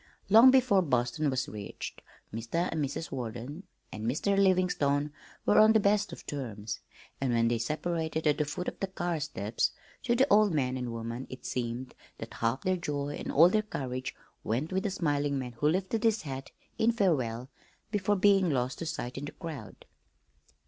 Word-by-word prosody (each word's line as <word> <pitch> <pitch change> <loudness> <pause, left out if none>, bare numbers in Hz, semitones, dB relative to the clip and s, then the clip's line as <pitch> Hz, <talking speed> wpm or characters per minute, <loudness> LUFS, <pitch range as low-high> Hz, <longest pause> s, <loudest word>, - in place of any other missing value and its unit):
Long 225 +5 +9
before 255 -7 +5
Boston 125 0 +1
was 130 -1 -1
reached 105 -2 -7 0.3
Mr. 115 +11 -1
and 155 -2 -1
Mrs. 140 +4 -4
Warden 125 - -6 0.3
and 110 - -6
"Mr. 160 - +1
Livingstone" 180 -7 +2 0.3
were - - +5
on 215 +1 +7
the 220 - +5
best 205 -1 +2
of 170 - -10
terms, 110 -7 -5 0.4
and 135 -2 +1
when 115 -1 +3
they 120 -1 0
separated 160 +4 -2
at 150 0 +3
the 150 - +2
foot 180 +5 -4
of - - -4
the 195 - -1
car 175 -3 -2
steps, 115 -7 -1 0.3
to 240 -1 +1
the 260 +2 +5
old 210 -4 +5
man 130 -3 +1
and 125 -2 -3
woman 115 +2 -5
it 130 - -9
seemed 125 +1 -3 0.2
that - - -8
half 115 +4 -1
their 185 0 +1
joy 145 -4 -3
and - - -4
all 165 +4 +7
their 215 +3 +2
courage 130 -11 -4 0.3
went 130 - -1
with 190 - +1
the 205 - -1
smiling 145 -6 0
man 125 -2 -4
who 150 - +3
lifted 190 +6 0
his 225 -1 +2
hat 135 -2 -6 0.3
in 225 +1 +4
farewell 135 - 0 0.4
before 205 -1 +1
being 195 -2 +4
lost 130 -3 -1
to 165 - -4
sight 135 -5 -4
in 145 - -5
the 145 - -7
crowd. 155 - -8
150 Hz, 185 wpm, -30 LUFS, 125-190 Hz, 0.4 s, Long